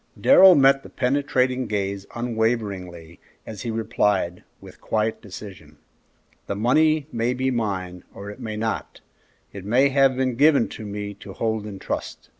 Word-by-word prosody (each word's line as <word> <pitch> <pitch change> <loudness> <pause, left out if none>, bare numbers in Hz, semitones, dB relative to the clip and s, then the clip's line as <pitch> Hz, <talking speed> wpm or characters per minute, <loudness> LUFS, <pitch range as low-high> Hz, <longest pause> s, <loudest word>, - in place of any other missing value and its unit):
Darrell 190 -9 +8
met 135 -1 +5
the - - -13
penetrating 130 -1 0
gaze 100 -1 -3
unwaveringly, 105 -8 -3 0.3
as 110 -3 -8
he 120 - -4
replied, 105 -5 -1 0.2
with - - -15
quiet 110 0 -1
decision, 95 -7 -11 0.7
"That 100 - -3
money 155 +7 +2
may 120 +2 -1
be 130 +1 0
mine, 95 -6 -3
or 100 +1 -9
it - - -13
may 110 -1 -5
not; 110 +1 -4 0.5
it 100 - -8
may 125 +7 +3
have 135 -1 +3
been 130 -2 -1
given 145 -3 +4 0.2
me 105 0 -5
to - - -10
hold 110 -2 -2
in 100 -2 -7
trust. - - -6
110 Hz, 150 wpm, -23 LUFS, 100-130 Hz, 0.7 s, Darrell